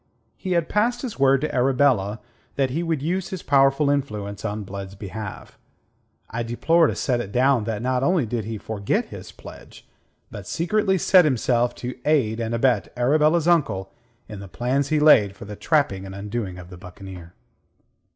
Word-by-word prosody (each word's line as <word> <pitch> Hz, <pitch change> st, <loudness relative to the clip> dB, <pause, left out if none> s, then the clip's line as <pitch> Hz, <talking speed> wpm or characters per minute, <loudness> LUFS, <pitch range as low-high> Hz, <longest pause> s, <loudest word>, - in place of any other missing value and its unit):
He 185 Hz, -2 st, -3 dB
had 170 Hz, -2 st, +1 dB
passed 240 Hz, +4 st, 0 dB
his 235 Hz, -, -6 dB
word 135 Hz, -1 st, +4 dB
to 155 Hz, -, -2 dB
Arabella 125 Hz, -5 st, +2 dB, 0.3 s
that 135 Hz, -2 st, 0 dB
he 160 Hz, +6 st, -1 dB
would 165 Hz, -5 st, -2 dB
use 180 Hz, +3 st, -2 dB
his 190 Hz, -3 st, -6 dB
powerful 135 Hz, +1 st, +3 dB
influence 105 Hz, -8 st, -3 dB
on 105 Hz, -1 st, -3 dB
Blood's 100 Hz, 0 st, -8 dB
behalf. 100 Hz, 0 st, -8 dB, 0.7 s
I 115 Hz, -, -4 dB
deplore 160 Hz, +8 st, +2 dB
to -, -, -2 dB
set 125 Hz, -3 st, 0 dB
it 100 Hz, -, -7 dB
down 125 Hz, -1 st, +2 dB
that 110 Hz, 0 st, -3 dB
not 130 Hz, 0 st, 0 dB
only 170 Hz, -1 st, +2 dB
did 115 Hz, -1 st, -3 dB
he 110 Hz, 0 st, -4 dB
forget 100 Hz, -1 st, -2 dB
his -, -, -9 dB
pledge, -, -, -14 dB, 0.4 s
but 100 Hz, -2 st, -9 dB
secretly 190 Hz, +3 st, +1 dB
set 185 Hz, +1 st, +5 dB
himself 125 Hz, -4 st, +1 dB
to 125 Hz, +1 st, -7 dB
aid 130 Hz, -8 st, +1 dB
and 115 Hz, 0 st, -2 dB
abet 115 Hz, -3 st, +1 dB
Arabella's 155 Hz, +6 st, +3 dB
uncle 110 Hz, -, +1 dB, 0.4 s
in 105 Hz, -2 st, -8 dB
the 100 Hz, -, -9 dB
plans 125 Hz, +8 st, -1 dB
he 155 Hz, -1 st, +2 dB
laid 110 Hz, -10 st, +5 dB
for 100 Hz, -, -10 dB
the 105 Hz, +1 st, -8 dB
trapping 140 Hz, -, 0 dB
and 95 Hz, -, -8 dB
undoing 100 Hz, -2 st, -4 dB
of 90 Hz, 0 st, -11 dB
the 90 Hz, -, -10 dB
buccaneer. 90 Hz, -1 st, -11 dB
125 Hz, 180 wpm, -23 LUFS, 105-150 Hz, 0.7 s, set